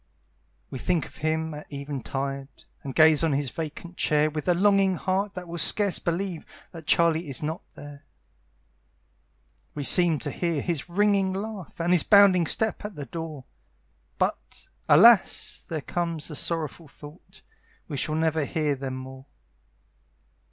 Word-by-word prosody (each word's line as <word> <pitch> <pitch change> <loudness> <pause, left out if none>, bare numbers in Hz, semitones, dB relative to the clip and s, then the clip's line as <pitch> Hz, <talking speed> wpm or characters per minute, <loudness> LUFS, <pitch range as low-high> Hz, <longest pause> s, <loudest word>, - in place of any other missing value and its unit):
We 130 - -6
think 175 +1 0
of - - -15
him 160 +1 -2
at 150 0 -10
eventide, 140 -1 -5 0.2
And 135 -2 -7
gaze 155 0 +5
on 160 -3 +1
his 135 -2 -1
vacant 165 +2 -7
chair 150 0 +2
With 155 +2 -5
a 180 - +3
longing 195 0 +3
heart 190 +3 -2
that 180 -1 -7
will 170 0 -5
scarce 200 +4 +3
believe 175 0 -3 0.3
That 160 -4 -11
Charlie 165 -1 +2
is 135 - -3
not 160 +3 -3
there. 145 0 -12 1.7
We 145 - -4
seem 170 +2 +5
to - - -3
hear 170 -4 -2
his 170 -2 -2
ringing 200 0 +1
laugh, 200 -3 -7
And 170 +1 0
his 180 -3 +6
bounding 195 -4 +5
step 220 -1 0
at 210 -2 -7
the 145 - -6
door; 155 -1 -7 0.7
But, - - -3 0.2
alas! - - +5
there 160 -2 -3
comes 170 -1 -3
the 150 - -7
sorrowful 165 +1 -3
thought, 150 +4 -15 0.4
We 150 - -6
shall 155 +3 -2
never 160 -1 0
hear 150 0 -1
them 135 -1 -5
more! 130 +1 -10
160 Hz, 150 wpm, -25 LUFS, 145-180 Hz, 1.7 s, his